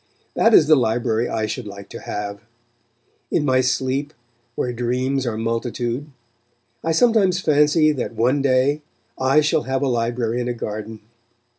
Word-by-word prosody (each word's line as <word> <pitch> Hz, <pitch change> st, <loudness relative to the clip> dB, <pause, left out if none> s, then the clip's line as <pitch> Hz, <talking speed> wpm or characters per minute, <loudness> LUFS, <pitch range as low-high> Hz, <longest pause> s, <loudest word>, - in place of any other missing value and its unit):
That 225 Hz, 0 st, +4 dB
is 155 Hz, -, +7 dB
the 155 Hz, +1 st, +6 dB
library 120 Hz, -2 st, 0 dB
I 110 Hz, -1 st, -1 dB
should 110 Hz, +1 st, -5 dB
like 100 Hz, 0 st, -9 dB
to -, -, -8 dB
have. 100 Hz, -1 st, -5 dB, 0.9 s
In 150 Hz, -, 0 dB
my 130 Hz, -2 st, +3 dB
sleep, 130 Hz, +3 st, -1 dB, 0.4 s
"where 125 Hz, -, -2 dB
dreams 125 Hz, +2 st, -1 dB
are 110 Hz, -2 st, -2 dB
multitude," 120 Hz, +3 st, -2 dB, 0.8 s
I 165 Hz, -, 0 dB
sometimes 195 Hz, -1 st, +3 dB
fancy 155 Hz, -1 st, +3 dB
that 130 Hz, -5 st, -4 dB
one 125 Hz, +6 st, +2 dB
day 135 Hz, +2 st, +2 dB, 0.4 s
I 135 Hz, +3 st, +4 dB
shall 150 Hz, -, +1 dB
have 135 Hz, +1 st, 0 dB
a -, -, +1 dB
library 120 Hz, -1 st, -1 dB
in 120 Hz, -, -3 dB
a 120 Hz, -, -2 dB
garden. 110 Hz, -1 st, -6 dB
130 Hz, 155 wpm, -21 LUFS, 115-145 Hz, 0.9 s, is